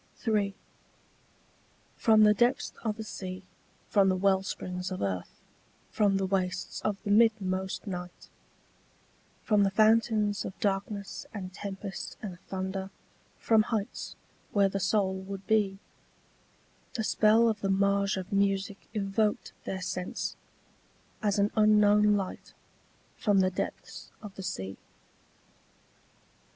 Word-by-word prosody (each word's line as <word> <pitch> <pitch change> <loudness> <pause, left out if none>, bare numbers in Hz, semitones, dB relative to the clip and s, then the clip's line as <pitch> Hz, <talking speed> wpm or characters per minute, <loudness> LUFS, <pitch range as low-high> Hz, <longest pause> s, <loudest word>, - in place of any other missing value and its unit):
III. 205 -3 +1 1.4
From 220 -1 +5
the 210 0 +7
depths 240 +4 +1
of 220 -2 -1
the 220 - -5
sea, 185 -3 -6 0.4
from 200 -3 +4
the 185 - +2
wellsprings 185 -1 0
of 185 - -4
earth, 95 -3 -3 0.5
from 200 -2 +2
the 195 - 0
wastes 185 -1 -2
of 210 -2 -1
the 205 - -1
midmost 200 -4 +2
night, 180 -3 -7 1.2
From 210 -2 +3
the 200 - +4
fountains 215 0 +3
of 190 - -7
darkness 200 0 -2
and 185 -2 -6
tempest 195 0 -6
and 185 -5 -7
thunder, 190 0 -3 0.5
from 220 -1 +4
heights 215 -1 -3 0.4
where 200 -1 +4
the 195 - -2
soul 190 0 +1
would 190 0 -7
be, 205 -3 +2 1.2
The 225 - -1
spell 220 +2 +4
of 220 -2 0
the 195 - 0
mage 200 0 +2
of 190 +1 -5
music 195 0 0
evoked 210 +1 0
their 190 0 -3
sense, 180 0 -3 0.9
as 205 -1 +1
an 205 +1 +2
unknown 210 -1 +5
light 195 -2 -6 0.6
From 205 -3 +3
the 185 0 +2
depths 185 - -5
of 205 -2 -8
the 195 - -8
sea. 95 - -4
200 Hz, 125 wpm, -29 LUFS, 190-210 Hz, 1.4 s, the